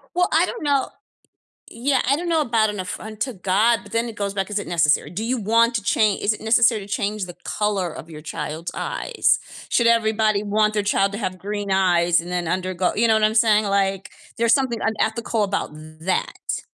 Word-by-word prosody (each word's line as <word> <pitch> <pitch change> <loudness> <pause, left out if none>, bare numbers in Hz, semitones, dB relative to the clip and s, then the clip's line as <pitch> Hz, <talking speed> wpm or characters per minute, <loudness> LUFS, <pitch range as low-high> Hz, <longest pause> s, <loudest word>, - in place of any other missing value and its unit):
Well, 360 +1 +3
I - - +4
don't 470 - -6
know 280 -2 +1 0.8
Yeah, 260 +3 0
I 280 - +4
don't 345 +1 -4
know 325 -2 +2
about 225 -4 +2
an 205 -2 -5
affront 215 +4 -7
to 260 - -2
God, 210 +4 +2
but - - -15
then 230 +1 0
it 225 - -9
goes 200 -1 -3
back, 195 +1 -2
is 205 - 0
it 200 - -6
necessary? 150 -4 +2
Do 205 +6 -4
you 250 +1 -1
want 230 +3 +2
to 215 - -3
chan 210 0 +2
Is 215 - +1
it - - -7
necessary 225 0 +3
to - - -10
change 205 -1 -2
the 175 0 -10
color 205 -4 -1
of 165 - -10
your 155 -1 -9
child's 155 +1 -5
eyes? - - 0 0.3
Should 235 - +3
everybody 220 -2 +2
want 215 +1 +1
their 210 - +1
child 200 -1 +1
to 205 - -4
have 185 -4 -4
green 205 0 -4
eyes 175 -3 +3
and 175 +1 -9
then 175 -2 -2
undergo 185 0 -1
You 230 +1 +3
know 220 - +5
what 215 0 +2
I'm 215 +1 +2
saying? 215 -2 +4
Like, 195 -1 0 0.3
there's 230 0 +3
something 255 -4 0
unethical 220 0 -1
about 200 -4 -2 0.3
that. 185 +3 -2
210 Hz, 215 wpm, -22 LUFS, 190-230 Hz, 0.8 s, know